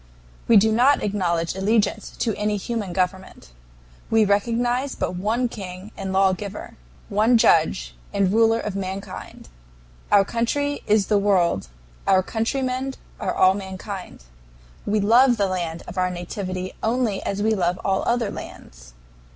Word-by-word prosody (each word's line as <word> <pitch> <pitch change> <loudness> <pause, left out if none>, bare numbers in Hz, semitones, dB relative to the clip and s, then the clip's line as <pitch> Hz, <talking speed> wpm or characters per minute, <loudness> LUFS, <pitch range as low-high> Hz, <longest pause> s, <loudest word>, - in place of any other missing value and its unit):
"We 230 - +7
do 220 +2 +4
not 250 +6 +4
acknowledge 175 -5 0
allegiance 205 +3 0
to 225 - 0
any 210 0 -1
human 210 -2 -4
government. 185 - -3 0.6
We 225 -1 +4
recognize 240 +6 0
but - - -2
one 220 +7 0
King 195 -2 -8
and 190 - -5
Lawgiver, 195 +1 0 0.3
one 220 +4 +3
Judge 110 - +2 0.2
and 195 -1 +1
Ruler 225 0 +4
of 210 -3 -4
mankind. 195 - -6 0.6
Our 200 -1 +6
country 285 +7 -1
is 210 -1 +3
the 210 -2 +2
world, 185 - +2 0.4
our 190 -1 +4
countrymen 255 +4 -2 0.2
are - - -2
all 185 0 +5
mankind. 190 - -7 0.6
We 210 +1 +2
love 240 +4 +5
the 200 - +2
land 175 -3 -3
of 185 +1 -5
our 185 0 +2
nativity 185 +1 -5
only 225 -3 0
as 200 +1 -2
we 220 +1 +2
love 180 -3 0
all 195 -1 +1
other 235 -3 +1
lands. - - -11
200 Hz, 145 wpm, -23 LUFS, 185-225 Hz, 0.6 s, We